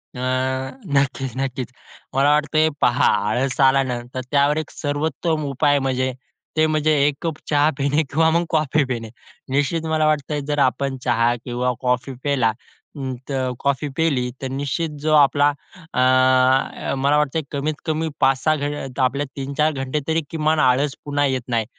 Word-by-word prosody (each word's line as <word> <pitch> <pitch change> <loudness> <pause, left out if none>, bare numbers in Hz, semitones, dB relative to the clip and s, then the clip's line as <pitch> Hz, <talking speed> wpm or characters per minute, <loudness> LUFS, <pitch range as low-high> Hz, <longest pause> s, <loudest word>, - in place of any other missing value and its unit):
अ, - - -6 0.8
नक्कीच 135 -2 0
नक्कीच! 130 -2 -3 0.4
मला 140 +2 +4
वाटतंय 150 +1 +2
हे 160 - +3
पहा, 120 +1 +3 0.2
आळस 130 +5 -1
आला 135 0 +5
ना 125 -2 -3
तर 130 - -3
त्यावर 145 +1 +3
एक 155 -1 -3
सर्वोत्तम 155 +2 -2
उपाय 145 +1 +2
म्हणजे 130 -1 -1 0.4
ते 155 - +5
म्हणजे 155 0 +2
एक 145 - 0
कप 160 -2 -3
चहा 145 0 +4
पिणे, 145 +3 +1
किंवा 160 +4 +2
मग 170 +1 +1
कॉफी 155 -2 +2
पिणे. 115 -4 -4 0.4
निश्चित 145 +4 0
मला 155 -1 +1
वाटतंय 150 -1 0
जर 145 -1 -1
आपण 135 0 +1
चहा 120 -1 +2
किंवा 125 0 -1
कॉफी 125 +1 -1
पिला 135 -6 +2 0.5
अं, 130 -1 -3 0.2
तर 130 -2 -1
कॉफी 140 +1 0
पिली, 140 -7 +1
तर 135 - -2
निश्चित 140 +4 -2
जो 155 +1 +1
आपला, 145 0 +5 0.4
अ, 130 +1 +3
मला 140 +2 +2
वाटतंय 150 +2 0
कमीत 145 +2 -1
कमी 160 0 -1
5-6 135 +4 +3
घं 145 -2 -4
आपले 140 +3 +1
3-4 140 +3 0
घंटे 135 +1 -2
तरी 160 0 +1
किमान 155 -1 +1
आळस 135 +1 +2
पुन्हा 145 0 +1
येत 130 -2 0
नाही. 115 -3 0
140 Hz, 160 wpm, -21 LUFS, 130-150 Hz, 0.8 s, आला